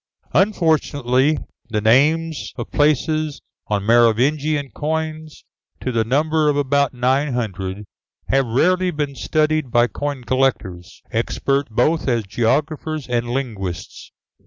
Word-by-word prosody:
Unfortunately, 150 - +2 0.3
the 110 -2 0
names 145 +7 +2
of - - -6
places 155 +1 +1 0.3
on 105 -2 -1
Merovingian 135 +6 +2
coins 155 0 -4 0.3
to 130 - -3
the 115 -2 +1
number 150 +5 +1
of 145 - +1
about 140 -1 +1
nine 130 +3 +1
hundred, 100 -3 -4 0.4
have 135 -2 +2
rarely 180 +10 +2
been 150 -4 -3
studied 155 0 0
by 120 0 +4
coin 145 +1 -4
collectors, 120 -10 -1
expert 140 -1 -1
both 135 +9 +1
as 120 -3 +1
geographers 145 +8 -1
and 120 -1 -1
linguists. 110 -9 -5
135 Hz, 115 wpm, -20 LUFS, 120-155 Hz, 0.4 s, by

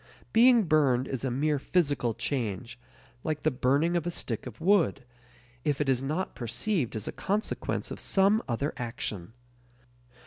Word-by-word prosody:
Being 235 0 +6
burned 140 -7 +3
is 130 -2 -4
a 135 - 0
mere 145 +4 +1
physical 140 -8 0
change, 120 -1 -3 0.4
like 155 -1 -2
the 155 - +2
burning 140 +6 +2
of 170 -1 0
a - - +1
stick 125 -9 -4
of 120 - -10
wood, 175 -6 +3 0.6
if 145 -2 0
it 150 - 0
is 130 -2 +2
not 155 +7 -2
perceived 130 - -2
as 110 - -4
a - - -2
consequence 205 +3 -2
of - - -6
some 200 +3 +3
other 135 +5 -1
action. 110 -5 -4
140 Hz, 160 wpm, -28 LUFS, 125-175 Hz, 0.6 s, Being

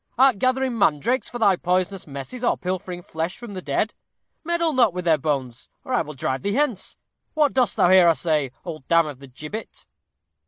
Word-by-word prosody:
Art 260 -5 +5
gathering 255 -1 +1
mandrakes 205 - +1
for 240 - -6
thy 205 -5 +4
poisonous 185 +1 -1
messes, 140 - -7
or 240 - +2
pilfering 180 -1 -4
flesh 165 +2 -4
from 240 -4 -9
the 185 - -5
dead? 165 +8 -1 0.5
Meddle 335 -1 0
not 235 -8 +3
with 180 -1 -4
their 160 -3 +3
bones, 130 -5 -3 0.2
or 260 - -4
I 245 - +3
will 150 -2 -7
drive 130 0 -2
thee 200 +1 -1
hence. 260 -9 -1 0.4
What 300 -3 +3
dost 255 -2 +2
thou 180 - +4
here, 185 -2 +7
I 165 - +6
say, 150 -3 0
old 155 -6 -7
dam 165 -1 +4
of 145 -4 -7
the 140 - -12
gibbet?" 150 - -8
185 Hz, 200 wpm, -23 LUFS, 155-245 Hz, 0.5 s, here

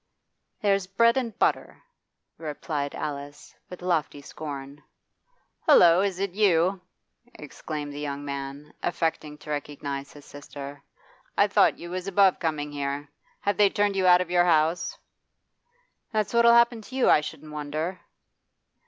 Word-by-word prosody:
'There's 195 -2 +2
bread 230 +4 +3
and 240 -5 -2
butter,' - - 0 0.6
replied 150 -2 -4
Alice, 145 0 -6 0.2
with 180 -1 -10
lofty 165 -5 -1
scorn. 140 -1 -8 0.9
'Hullo! 170 +1 +7
Is 195 -2 -1
it 195 -1 -1
you?' 185 -2 +2 0.5
exclaimed 150 0 -7
the 145 - -7
young 145 -1 -4
man, 140 +1 -6
affecting 160 -3 -2
to 150 - -9
recognise 145 -1 -5
his 145 -1 -14
sister. 145 0 -9 0.6
'I - - +5
thought - - +4
you 170 0 -9
was 185 +1 -4
above 195 -1 +4
coming 150 -2 -2
here 145 0 -4 0.3
Have 200 -2 0
they 205 -1 +5
turned 205 -1 0
you 190 -1 +2
out 180 0 +7
of 180 -1 -4
your 175 0 +4
house?' 165 0 +1 1.1
'That's 215 -1 -1
what'll 235 0 +6
happen 235 -1 +4
to 255 +5 -11
you, 265 - +2
I - - +6
shouldn't 150 0 -8
wonder. 155 +5 -4
160 Hz, 145 wpm, -26 LUFS, 145-195 Hz, 1.1 s, Hullo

